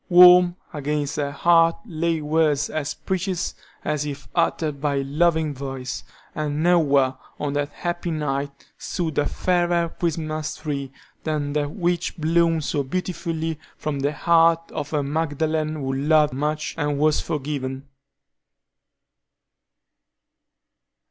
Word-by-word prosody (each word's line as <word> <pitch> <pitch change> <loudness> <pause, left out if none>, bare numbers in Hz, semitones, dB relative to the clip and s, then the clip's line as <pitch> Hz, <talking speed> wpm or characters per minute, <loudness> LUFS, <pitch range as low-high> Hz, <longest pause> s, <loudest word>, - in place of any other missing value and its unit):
Warm 180 0 +8 0.2
against 145 0 -2
her 145 -1 0
heart 165 +3 +4
lay 165 -4 -1
words 150 -1 +1
as 155 -1 -2
precious 185 -1 -2 0.3
as 150 -1 0
if 145 -2 -6
uttered 150 -4 0
by 145 -1 +1
a 135 - 0
loving 155 +2 +1
voice, 135 -1 -5 0.3
and 150 0 -2
nowhere, 145 -7 +3 0.2
on 145 -1 -2
that 145 0 -1
happy 175 +3 -3
night, 145 -3 -1 0.3
stood 165 -6 -2
a 145 - +2
fairer 175 -2 +1
Christmas 155 -2 -2
tree 140 -3 -4 0.3
than 150 -2 -1
that 145 -1 0
which 175 +1 -1
bloomed 165 0 +2
so 145 - 0
beautifully 165 +1 -3 0.2
from 150 -2 -3
the 140 +2 +1
heart 165 +1 +3
of 145 -2 -4
a 150 -2 0
Magdalen 155 +1 -1
who 135 -3 -3
loved 150 +2 +3
much 150 +3 -2
and 145 -1 0
was 155 +1 +3
forgiven. 135 -2 -4
155 Hz, 125 wpm, -23 LUFS, 145-165 Hz, 0.3 s, Warm